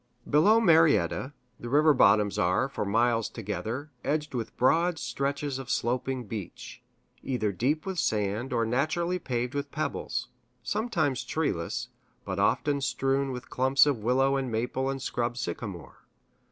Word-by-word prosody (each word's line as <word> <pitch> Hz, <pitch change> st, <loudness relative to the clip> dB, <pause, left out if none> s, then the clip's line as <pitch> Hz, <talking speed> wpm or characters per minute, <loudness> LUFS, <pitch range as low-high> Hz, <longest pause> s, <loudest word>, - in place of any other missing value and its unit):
Below 200 Hz, +10 st, +5 dB
Marietta, 160 Hz, -, +3 dB, 0.3 s
the 120 Hz, -, -6 dB
river 150 Hz, +3 st, +5 dB
bottoms 105 Hz, -4 st, +4 dB
are, 90 Hz, +9 st, +2 dB
for 135 Hz, -, -4 dB
miles 115 Hz, +2 st, +1 dB
together, 115 Hz, +6 st, -5 dB
edged 150 Hz, 0 st, -1 dB
with 115 Hz, -3 st, -4 dB
broad 165 Hz, +6 st, +3 dB
stretches 140 Hz, -2 st, -2 dB
of 130 Hz, -2 st, -8 dB
sloping 125 Hz, +1 st, -1 dB
beach, 105 Hz, -4 st, -8 dB, 0.4 s
either 120 Hz, -6 st, -1 dB
deep 135 Hz, -, -1 dB
with 190 Hz, -2 st, -3 dB
sand 105 Hz, +3 st, -1 dB
or 115 Hz, -2 st, +1 dB
naturally 155 Hz, +9 st, 0 dB
paved 125 Hz, -4 st, -2 dB
with 140 Hz, 0 st, -3 dB
pebbles 155 Hz, +1 st, -3 dB, 0.3 s
sometimes 155 Hz, -, -1 dB
treeless, 125 Hz, -, -2 dB, 0.4 s
but -, -, -3 dB
often 145 Hz, -1 st, +1 dB
strewn 135 Hz, 0 st, 0 dB
with 125 Hz, 0 st, -8 dB
clumps 130 Hz, +2 st, +4 dB
of 140 Hz, -5 st, 0 dB
willow 135 Hz, +5 st, +2 dB
and 130 Hz, -3 st, -2 dB
maple 125 Hz, +4 st, -1 dB
and 135 Hz, -1 st, -4 dB
scrub 120 Hz, 0 st, -2 dB
sycamore. 100 Hz, -7 st, -6 dB
130 Hz, 140 wpm, -28 LUFS, 115-150 Hz, 0.4 s, Below